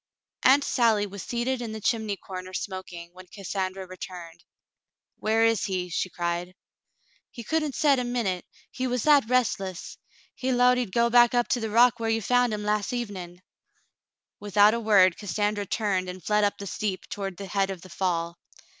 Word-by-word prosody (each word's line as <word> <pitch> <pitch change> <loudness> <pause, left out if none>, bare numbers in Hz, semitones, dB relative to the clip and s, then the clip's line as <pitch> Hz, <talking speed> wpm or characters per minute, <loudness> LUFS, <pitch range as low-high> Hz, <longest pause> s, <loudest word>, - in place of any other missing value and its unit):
Aunt 275 +2 +5
Sally 225 -6 +2
was 200 -1 -8
seated 245 +4 -2
in 225 -2 -5
the 220 - -5
chimney 215 -2 -1
corner 185 -1 -8
smoking, 185 -3 -6
when 185 0 -13
Cassandra 190 0 -4
returned. 180 -2 -10 0.7
"Where 225 +1 +2
is 225 -2 +2
he.^^" 180 -2 -3
she 185 - -1
cried. 175 +1 -3 0.7
"He 235 - -9
couldn't 305 +1 -1
set 285 -4 +3
a - - -1
minute, 235 -7 -2 0.3
he 260 0 -3
was 250 -2 -1
that 285 -6 +4
restless. 195 -8 -1 0.3
He 260 0 -2
'lowed 250 0 +4
he'd 240 -6 -3
go 235 +4 +3
up 240 0 +4
to 245 - +1
the 220 -1 -3
rock 240 +2 +4
whar 225 -1 -1
you 225 -1 0
found 245 +1 +2
him 210 -1 -3
las' 210 -1 0
evenm. 190 -7 -5 1.0
Without 205 +1 +4
a 235 - -1
word, 200 -5 +4
Cassandra 205 0 -2
turned 190 -4 -1
and 180 0 -8
fled 210 0 +2
up 205 - +1
the 200 - -7
steep 195 -1 -4
toward 195 -3 -5
the 200 - -6
head 195 +1 0
of 190 -3 -6
the 185 - -13
fall. 170 -2 -2
205 Hz, 180 wpm, -26 LUFS, 185-240 Hz, 1.0 s, Aunt